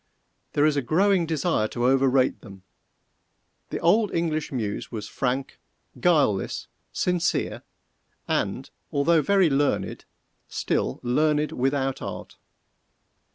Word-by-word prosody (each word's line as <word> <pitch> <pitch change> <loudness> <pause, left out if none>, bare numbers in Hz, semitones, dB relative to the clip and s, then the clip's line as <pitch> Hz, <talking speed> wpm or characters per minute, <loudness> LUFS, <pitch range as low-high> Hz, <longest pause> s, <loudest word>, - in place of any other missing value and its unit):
_There 145 - +4
is 150 - +1
a 140 - +1
growing 180 +6 +2
desire 160 -7 0
to 120 +2 -2
overrate 135 0 +3
them. 95 -5 -13 1.1
The - - -3
old 205 +4 +3
English 160 -2 -1
muse 110 -6 -3
was 110 -3 -5
frank, 135 +1 -2 0.4
guileless, 140 - +1 0.2
sincere, 180 -2 0 0.7
and - - -2 0.2
although 155 +3 +3
very 190 0 +3
learned, 140 +1 0 0.4
still - - -1
learned 150 +4 +1
without 135 +1 -1
art. - - -7
145 Hz, 110 wpm, -25 LUFS, 130-165 Hz, 1.1 s, There